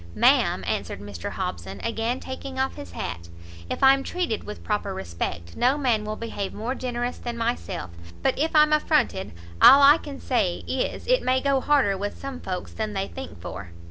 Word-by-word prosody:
"Ma'am," -, -, +4 dB
answered -, -, -2 dB
Mr 100 Hz, -4 st, -6 dB
Hobson, 95 Hz, +2 st, -5 dB
again 230 Hz, +2 st, -1 dB
taking 260 Hz, 0 st, -7 dB
off 265 Hz, 0 st, 0 dB
his 90 Hz, -3 st, -10 dB
hat, 85 Hz, 0 st, -5 dB, 0.4 s
"if -, -, -3 dB
I'm 270 Hz, 0 st, +7 dB
treated 340 Hz, -, -2 dB
with 210 Hz, -, -8 dB
proper 205 Hz, -2 st, -2 dB
respect, 85 Hz, -1 st, -5 dB
no 255 Hz, +4 st, +3 dB
man 240 Hz, -7 st, +1 dB
will 215 Hz, 0 st, -3 dB
behave 210 Hz, -4 st, -5 dB
more 230 Hz, +4 st, -2 dB
generous 245 Hz, -1 st, -3 dB
than 240 Hz, -1 st, -5 dB
myself; 230 Hz, -, -3 dB, 0.3 s
but 265 Hz, -, +2 dB
if 315 Hz, +2 st, 0 dB
I'm 305 Hz, 0 st, +6 dB
affronted, 300 Hz, -10 st, +1 dB, 0.3 s
all 275 Hz, +2 st, +10 dB
I 290 Hz, +3 st, +8 dB
can 280 Hz, -2 st, -8 dB
say 210 Hz, -9 st, 0 dB
is, 260 Hz, -, -2 dB
it -, -, +3 dB
may 255 Hz, +1 st, +2 dB
go 275 Hz, 0 st, +1 dB
harder 275 Hz, -10 st, +3 dB
with 205 Hz, +1 st, -4 dB
some 275 Hz, -2 st, -6 dB
folks 185 Hz, -1 st, -5 dB
than 215 Hz, -1 st, -3 dB
they 195 Hz, 0 st, -2 dB
think 265 Hz, -, -8 dB
for." 90 Hz, +1 st, -8 dB
235 Hz, 185 wpm, -25 LUFS, 190-270 Hz, 0.4 s, all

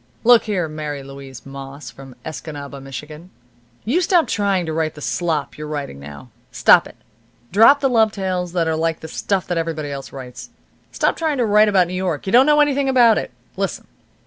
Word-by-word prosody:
"Look 240 Hz, 0 st, +6 dB
here, 190 Hz, -6 st, -1 dB
Mary 150 Hz, -2 st, -6 dB
Louise 135 Hz, -1 st, -11 dB
Moss, 135 Hz, +1 st, -9 dB
from 135 Hz, -2 st, -13 dB
Escanaba, 145 Hz, -3 st, -7 dB
Michigan, 150 Hz, +5 st, -9 dB, 0.6 s
you 285 Hz, +12 st, +1 dB
stop 350 Hz, -2 st, +3 dB
trying 200 Hz, -4 st, 0 dB
to 160 Hz, -, -4 dB
write 155 Hz, -1 st, -1 dB
the -, -, -10 dB
slop 155 Hz, -1 st, -2 dB
you're 150 Hz, -, -6 dB
writing 145 Hz, -, -5 dB
now. 70 Hz, 0 st, -11 dB, 0.2 s
Stop -, -, +5 dB
it. -, -, -15 dB, 0.6 s
Drop 225 Hz, +8 st, +6 dB
the 275 Hz, -, +3 dB
love 225 Hz, -4 st, +3 dB
tales 185 Hz, -3 st, -3 dB
that 170 Hz, -2 st, 0 dB
are 160 Hz, -, 0 dB
like 160 Hz, 0 st, -1 dB
the 160 Hz, -, -7 dB
stuff 190 Hz, +3 st, -2 dB
that 175 Hz, -2 st, -1 dB
everybody 155 Hz, -3 st, -3 dB
else 140 Hz, -1 st, -7 dB
writes. 130 Hz, -2 st, -9 dB, 0.4 s
Stop -, -, 0 dB
trying 315 Hz, -3 st, -1 dB
to 245 Hz, -, +1 dB
write 210 Hz, 0 st, +4 dB
about 190 Hz, -3 st, +4 dB
New 180 Hz, -, -7 dB
York. 185 Hz, -5 st, -2 dB
You 190 Hz, -, -3 dB
don't 255 Hz, +4 st, +6 dB
know 300 Hz, 0 st, +5 dB
anything 280 Hz, -2 st, +1 dB
about 240 Hz, -4 st, +5 dB
it. -, -, -6 dB, 0.3 s
Listen. -, -, -3 dB
165 Hz, 200 wpm, -20 LUFS, 145-215 Hz, 0.6 s, Look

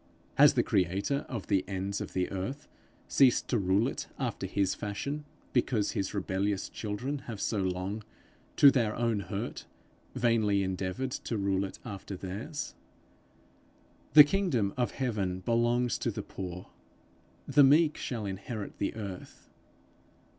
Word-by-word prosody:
Has -, -, +6 dB
the -, -, +3 dB
creator 95 Hz, -, 0 dB
of 115 Hz, -6 st, -4 dB
the 95 Hz, -3 st, +2 dB
ends 100 Hz, +1 st, -3 dB
of -, -, -6 dB
the 90 Hz, -1 st, -1 dB
earth 100 Hz, +10 st, -4 dB, 0.4 s
ceased 130 Hz, -3 st, +4 dB
to -, -, +2 dB
rule 100 Hz, +4 st, +2 dB
it -, -, -4 dB
after 115 Hz, -7 st, -2 dB
his 100 Hz, 0 st, +1 dB
fashion, 140 Hz, +9 st, -4 dB, 0.3 s
because 120 Hz, -4 st, +1 dB
his 95 Hz, -1 st, -2 dB
rebellious 100 Hz, +1 st, -1 dB
children 120 Hz, +7 st, -3 dB
have 110 Hz, -4 st, -5 dB
so 105 Hz, -, 0 dB
long, 95 Hz, +3 st, -2 dB, 0.5 s
to 140 Hz, -, +8 dB
their 115 Hz, -5 st, +1 dB
own 115 Hz, -3 st, +1 dB
hurt, 100 Hz, +4 st, -5 dB, 0.5 s
vainly 110 Hz, -4 st, +2 dB
endeavoured 95 Hz, +7 st, -2 dB
to 115 Hz, -, -3 dB
rule 100 Hz, -1 st, +1 dB
it 95 Hz, -, -8 dB
after 100 Hz, -3 st, -6 dB
theirs? 105 Hz, -, -5 dB, 1.4 s
The 150 Hz, -, +12 dB
kingdom 145 Hz, -, 0 dB
of 125 Hz, -1 st, +1 dB
heaven 100 Hz, -8 st, -2 dB
belongs 120 Hz, +3 st, +1 dB
to -, -, -1 dB
the -, -, -4 dB
poor; 90 Hz, -1 st, -7 dB, 0.8 s
the 140 Hz, +1 st, +6 dB
meek 150 Hz, +3 st, +5 dB
shall 115 Hz, -5 st, -4 dB
inherit 100 Hz, +2 st, -5 dB
the 100 Hz, -, -1 dB
earth. 100 Hz, -4 st, -8 dB
105 Hz, 140 wpm, -30 LUFS, 95-125 Hz, 1.4 s, The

